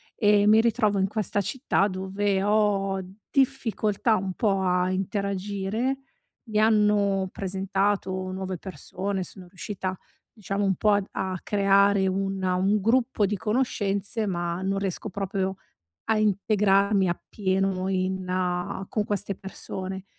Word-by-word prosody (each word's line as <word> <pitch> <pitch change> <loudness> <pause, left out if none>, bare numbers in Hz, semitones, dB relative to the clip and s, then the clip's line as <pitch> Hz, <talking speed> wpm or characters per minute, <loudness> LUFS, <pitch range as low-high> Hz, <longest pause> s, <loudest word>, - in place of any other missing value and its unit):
e 205 -2 +4
mi 220 +1 +7
ritrovo 220 -3 +2
in 190 - +2
questa 205 -1 -1
città 205 -1 +1
dove 190 +1 -1
ho 200 -2 +2 0.3
difficoltà 225 -5 +1
un 190 -2 -2
po' 195 -1 +1
a 180 0 +2
interagire. 200 +5 -2 0.5
Mi 215 0 +1
hanno 210 -3 +3
presentato 195 0 -1 0.2
nuove 190 -1 -4
persone, 190 +2 -3
sono 180 0 -11
riuscita, 185 0 -5 0.3
diciamo 200 -2 -3
un 195 -1 +2
po' 210 +4 +2
ad 205 -1 +2
a 190 -1 -2
creare 200 -1 +3
una 190 -1 -1
un 195 +3 +2
gruppo 230 +1 +2
di 205 +2 -1
conoscenze, 210 -1 -1
ma 175 -1 -2
non 195 +1 -1
riesco 195 +2 -2
proprio, 190 0 -2 0.5
a 220 - +2
integrarmi 200 -1 +3
appieno 190 +1 -1
in 185 -1 -1
con 215 - -1
queste 205 -1 -1
persone. 190 -1 -6
195 Hz, 125 wpm, -26 LUFS, 190-210 Hz, 0.5 s, mi